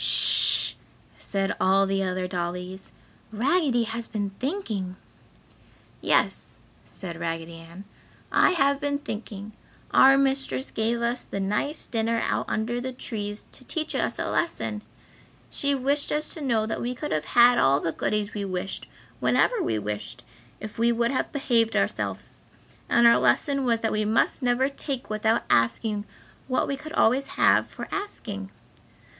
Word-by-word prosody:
"Sh!" - - +6 0.5
said 195 -1 -2
all 195 +1 +4
the 195 0 0
other 185 -1 -1
dollies, 180 +1 -5 0.4
"Raggedy 255 +2 +2
has 230 +1 -5
been 205 -3 -3
thinking!" 225 - -3 1.1
"Yes," - - +1 0.3
said 170 -3 -9
Raggedy 165 0 -4
Ann, 165 +3 -12 0.5
"I - - +5
have 280 -4 +2
been 285 -1 -1
thinking; 210 -5 -7 0.4
our 270 +1 +7
mistress 270 0 0
gave 230 +2 -1
us 240 +1 -1
the 200 - -5
nice 210 +10 -1
dinner 230 0 0
out - - -1
under 235 +3 -1
the 260 +1 -4
trees 210 -4 -5
to - - -10
teach 310 +4 -3
us - - -1
a - - -2
lesson. 215 -10 -2 0.7
She 280 0 0
wished 280 +2 0
us 300 +1 -2
to 320 - -9
know 230 -6 +1
that 220 - -3
we 245 +1 -3
could 300 +4 -5
have 155 0 -1
had 240 0 +7
all 140 +1 +4
the 165 - -2
goodies 210 +4 -2
we 205 - -3
wished, 185 0 -4 0.3
whenever 485 -4 +2
we 110 - 0
wished, 105 0 -4 0.4
if 215 +1 -8
we 230 - +3 0.2
had 260 - -1
behaved 235 -5 +1
ourselves. - - -2 0.5
And 235 - +4
our 235 - +7
lesson 275 -3 +2
was 230 -2 +1
that 225 - 0
we 215 0 0
must 225 +6 +1
never 250 +1 +2
take 275 -3 -5
without 220 +2 +1
asking 205 - +1 0.4
what 255 -1 0
we 275 - -1
could 310 +3 -9
always 265 0 +3
have - - +4
for - - -8
the - - -12
asking! 210 - -5
225 Hz, 155 wpm, -26 LUFS, 195-270 Hz, 1.1 s, our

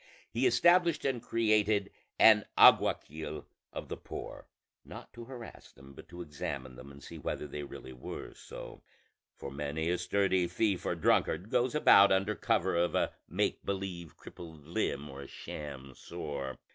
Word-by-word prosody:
He 125 +3 +2
established 170 +7 +4
and 130 -4 0
created 110 -3 +1 0.3
an 110 -2 +7
alguacil 75 0 +4 0.3
of - - -6
the - - -5
poor, - - -8 0.4
not - - -11
to 120 -1 -9
harass 120 -2 -10
them, 70 0 -15
but - - -13
to 85 0 -7
examine 70 -4 -6
them 65 +3 -11
and 70 0 -14
see - - -9
whether - - -4
they 75 +1 -6
really 70 -2 -9
were 60 - -8
so; - - -10 0.5
for 70 - -8
many 75 +4 -2
a 90 - 0
sturdy 95 -1 +1
thief 95 +2 0
or - - 0
drunkard 85 +3 +1
goes 125 +3 +1
about 100 -9 +7
under 95 +2 +2
cover 105 -6 0
of 85 +1 +1
a - - +1 0.2
make - - -1
believe 95 -4 -5
crippled 80 -4 -12
limb 75 -5 -2
or 70 -1 -9
a 70 - -9
sham 70 -3 -8
sore. 70 0 -6
85 Hz, 160 wpm, -31 LUFS, 75-110 Hz, 0.5 s, an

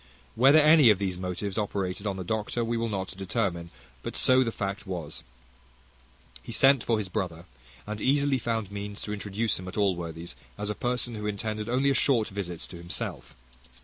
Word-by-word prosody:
Whether 135 +6 +6
any 155 -4 +7
of 105 - +6
these 95 -2 -2
motives 95 +2 -3
operated 100 -1 -2
on 100 -1 -2
the 95 - -4
doctor, 110 +4 -1
we 115 +1 -1
will 115 0 -1
not 95 -2 -3
determine; 95 -3 -2 0.3
but - - -5
so 130 0 +5
the 115 - -1
fact 100 -1 -4
was. 85 -5 -5 1.2
He - - -9
sent 135 -2 +5
for 115 - +1
his 105 -3 -3
brother, 85 -2 -3 0.4
and 105 0 -5
easily 140 +1 +3
found 115 -4 -2
means 100 0 -6
to 105 - -4
introduce 105 +1 -1
him 95 - -8
at 95 - -7
Allworthy's 85 -4 -1 0.2
as 105 0 -2
a - - -1
person 120 +2 -1
who 105 -1 -4
intended 105 +1 -3
only 135 +3 +3
a - - +3
short 120 -4 +2
visit 90 -4 -5
to 90 - -9
himself. 85 0 -6
105 Hz, 185 wpm, -28 LUFS, 95-115 Hz, 1.2 s, any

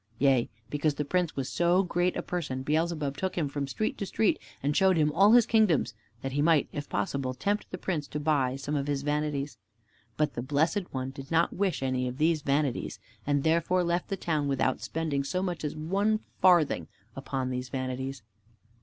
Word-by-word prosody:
Yea, 135 -2 +3 0.2
because 145 0 +1
the 150 - -2
Prince 180 +2 0
was 135 -2 -2
so 175 +5 +3
great 175 0 0
a - - -2
person, 145 -7 -3
Beelzebub 155 -1 0
took 190 -1 -2
Him 160 -4 +1
from 140 0 -3
street 215 +10 -2
to 200 - -3
street 215 +2 +1 0.2
and 145 +1 +1
showed 190 -2 +4
Him 150 -1 +3
all 195 +7 +5
his 240 -2 +7
kingdoms, 215 - +3 0.3
that 135 - -2
he 145 +2 0
might, 160 -1 +4
if 145 - -5
possible, 130 -2 -2
tempt 205 +11 -1
the 185 - -5
Prince 165 -6 -2
to 150 - -4
buy 145 -4 +1
some 140 +2 -4
of 140 -1 -1
his 140 -1 -1
vanities. 145 -1 -2 0.6
But 150 -2 +1
the - - -3
Blessed 160 - 0
One 130 0 -3
did 135 0 -10
not 165 +1 +2
wish 190 -7 0
any 130 -1 0
of 125 +1 -5
these 160 0 +2
vanities, 140 -2 0 0.3
and 145 -1 +2
therefore 170 +3 +2
left 175 +1 0
the 195 - -3
town 155 -5 -1
without 130 -2 0
spending 155 -4 -2
so 185 +7 -2
much 175 -5 -3
as 150 - -3
one 200 +8 0 0.2
farthing 175 -5 +4 0.3
upon 135 -1 -3
these 125 0 -4
vanities. 130 -1 -4
150 Hz, 200 wpm, -29 LUFS, 135-175 Hz, 0.6 s, his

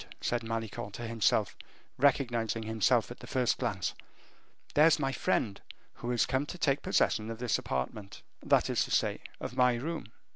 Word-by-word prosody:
said 120 0 -1
Malicorne 115 -2 -4
to 120 +5 -6
himself, 115 -3 +1 0.4
recognizing 120 -5 +2
him 110 0 -5
at 95 - +2
the - - -10
first 125 -2 +1
glance; - - -1 0.8
"there's 155 +2 +6
my 135 -3 0
friend, 110 -5 0 0.3
who 120 - -6
is 120 -1 +2
come 130 +3 0
to 180 - -6
take 140 -4 +1
possession 110 0 +1
of 115 0 -6
his 125 -2 +1
apartment, 95 +10 -4 0.2
that - - +3
is - - +1
to - - -10
say, - - +1 0.2
of - - -6
my 125 -1 +4
room." 155 +7 -4
120 Hz, 170 wpm, -31 LUFS, 110-135 Hz, 0.8 s, there's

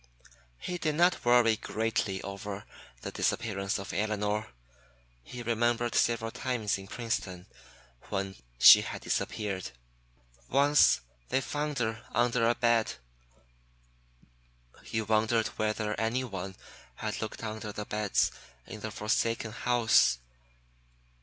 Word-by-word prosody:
He 180 - -5
did 155 -3 0
not 175 +2 +3
worry 120 -2 +5
greatly 110 -4 -2
over 100 +1 -6 0.4
the - - -4
disappearance 100 -3 -1
of 100 - -6
Elinor. 105 0 -1 0.7
He 120 - -8
remembered 120 +1 +1
several 115 -1 +1
times 115 -7 -1
in 95 - -10
Princeton 95 -6 -3 0.6
when 95 0 -2 0.2
she - - +10
had - - -6
disappeared. 100 - -2 0.8
Once 145 +2 +5 0.3
they - - +2
found 145 +1 -3
her 115 -2 -2
under 120 -1 +2
a 120 - +2
bed. 120 -2 +2 1.9
He 110 - -3
wondered 110 +1 +2
whether 110 0 -1
anyone 110 -5 -2 0.4
had - - -4
looked 110 +1 -5
under 110 -1 -5
the 105 0 -5
beds 105 -1 +1 0.3
in 110 - -9
the 110 - -5
forsaken 110 +1 -1
house. 115 - +3
110 Hz, 115 wpm, -30 LUFS, 105-120 Hz, 1.9 s, she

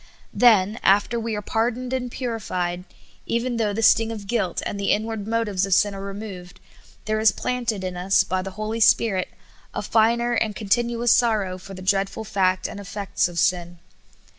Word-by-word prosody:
Then, 215 -3 +4
after 205 +4 +3
we 225 -1 -3
are 210 - -4
pardoned 245 +4 -1
and 250 -1 -2
purified, 185 -8 -3 0.4
even 235 +1 -1
though 215 -2 0
the 225 +3 -2
sting 225 +2 +4
of 210 -3 -7
guilt 195 -5 -1
and 200 - -4
the 200 - -1
inward 215 -1 -1
motives 220 -4 0
of 190 - +3
sin 205 -1 +2
are 195 - -7
removed, 195 -3 -8 0.5
there 215 0 0
is 220 -1 +5
planted 235 -2 -2
in 185 -1 -4
us, 185 +2 +2
by 185 0 -2
the 195 - -5
Holy 215 +1 -3
Spirit, 205 -3 +3 0.5
a - - -2
finer 235 +2 +2
and 215 -3 0
continuous 235 +2 +1
sorrow 210 -6 +1
for 195 +1 -10
the 185 - -9
dreadful 195 +2 0
fact 185 -2 0
and - - -8
effects 200 -1 -2
of 175 -1 -9
sin. 175 0 0
210 Hz, 180 wpm, -23 LUFS, 190-230 Hz, 0.5 s, is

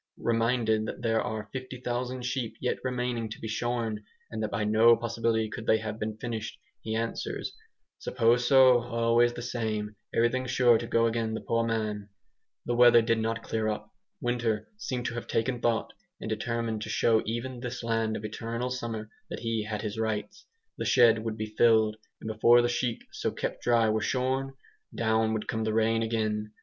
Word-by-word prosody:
Reminded 115 -2 +1
that - - -6
there 115 -1 +2
are 110 -1 -4
50,000 125 -1 -4
sheep 125 -3 -2
yet 125 - -1
remaining 125 -3 -2
to 110 - -8
be 110 - -5
shorn, 115 -1 -2 0.3
and 110 -1 -4
that 110 - -1
by 105 - -1
no 110 +2 +6
possibility 115 -1 0
could 110 +1 -7
they 110 - +5
have 110 0 -5
been 110 0 -3
finished, 115 -2 -5 0.2
he 110 0 -3
answers, 115 +1 -3 0.5
"Suppose 120 +2 +2
so, 130 -2 +7
always 120 0 +2
the 120 - -6
same, 110 -3 -3 0.2
everything 125 +3 +1
sure 120 -2 +4
to 115 - -5
go 115 0 +3
agin 115 -1 -1
the - - -4
poor 115 0 0
man." 110 -3 -2 0.6
The 120 - 0
weather 120 -1 +7
did 115 0 +1
not 115 0 -2
clear 110 -1 -1
up. 105 0 -4 0.3
Winter 120 -3 -1
seemed 130 - -4
to 120 - -2
have 120 - -5
taken 120 +1 -1
thought, 115 -1 0 0.3
and - - -6
determined 110 0 -2
to - - -5
show 110 -1 +3
even 120 +3 -3
this 125 0 -5
land 115 -1 0
of 105 - -7
eternal 115 +3 -4
summer 115 -3 -4 0.2
that - - -6
he 115 -2 -1
had 105 -1 -4
his 105 0 -4
rights. 105 -2 -3 0.3
The - - -1
shed 115 -2 +5
would 110 -1 -3
be 110 0 -5
filled, 110 -2 +4 0.2
and - - -8
before 115 +2 +5
the 120 - +1
sheep 120 -1 -1
so - - -2
kept - - -4
dry 115 -2 +3
were 110 0 +1
shorn, 130 +3 -1 0.4
down 110 -1 +1
would 110 -1 -3
come 110 -3 -1
the 110 0 -1
rain 115 0 +2
again. 110 -2 -1
115 Hz, 185 wpm, -28 LUFS, 110-120 Hz, 0.6 s, so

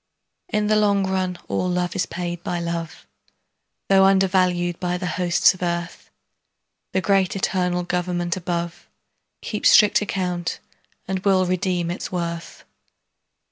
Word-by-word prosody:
In 210 0 0
the 215 +1 +2
long 200 -2 +3
run 185 -1 -1
all 100 - -1
love 180 -1 -1
is 195 - 0
paid 175 -1 -5
by 175 - -2
love, 170 -1 -5 0.8
Though 195 0 +5
undervalued 185 -2 +2
by 180 -1 -1
the 180 - -5
hosts 180 +2 +3
of 185 - -15
earth; 170 -1 -3 0.8
The 190 - 0
great 195 -1 +2
eternal 180 -2 0
Government 175 -1 -1
above 170 -2 -4 0.6
Keeps 210 - +1
strict 210 -1 +6
account 180 -4 -2 0.5
and 190 0 -1
will 190 -1 +2
redeem 180 -1 -1
its 175 - -5
worth. 170 -2 -5
180 Hz, 135 wpm, -22 LUFS, 175-190 Hz, 0.8 s, strict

